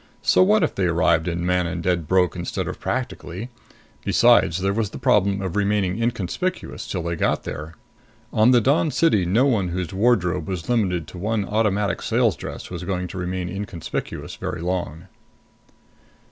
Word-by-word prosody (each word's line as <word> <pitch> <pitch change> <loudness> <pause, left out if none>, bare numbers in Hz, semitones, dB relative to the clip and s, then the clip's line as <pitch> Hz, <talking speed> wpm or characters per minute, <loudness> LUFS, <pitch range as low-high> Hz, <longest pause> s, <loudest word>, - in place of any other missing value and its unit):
So - - +4
what 210 +3 +4
if - - 0
they 95 - 0
arrived 85 0 +2
in 85 0 -2
Manon 90 -1 0
dead 85 -2 0
broke 90 -3 +2
instead - - -3
of - - -5
practically? 110 -3 -4 0.5
Besides, 80 - +4
there 100 +1 +1
was 110 -1 -1
the - - -8
problem 100 -6 +2
of 95 0 -4
remaining 100 0 +1
inconspicuous 120 - -2
till 90 -3 -3
they 85 0 -2
got - - 0
there. 75 +3 -6 0.6
On 110 +2 +5
the 125 -2 +5
Dawn 145 +7 +2
City 125 - +2
no 110 +9 +3
one 110 -9 +2
whose 90 -1 -3
wardrobe 95 -7 +1
was 90 -4 -4
limited 95 -9 +1
to 90 - -9
one 105 +1 -1
Automatic 105 -1 0
Sales - - +2
dress - - -8
was - - -5
going 90 0 -2
to 90 - -7
remain 90 0 -3
inconspicuous 95 -2 -5
very - - -4
long. 90 -1 -3
95 Hz, 170 wpm, -23 LUFS, 90-110 Hz, 0.6 s, On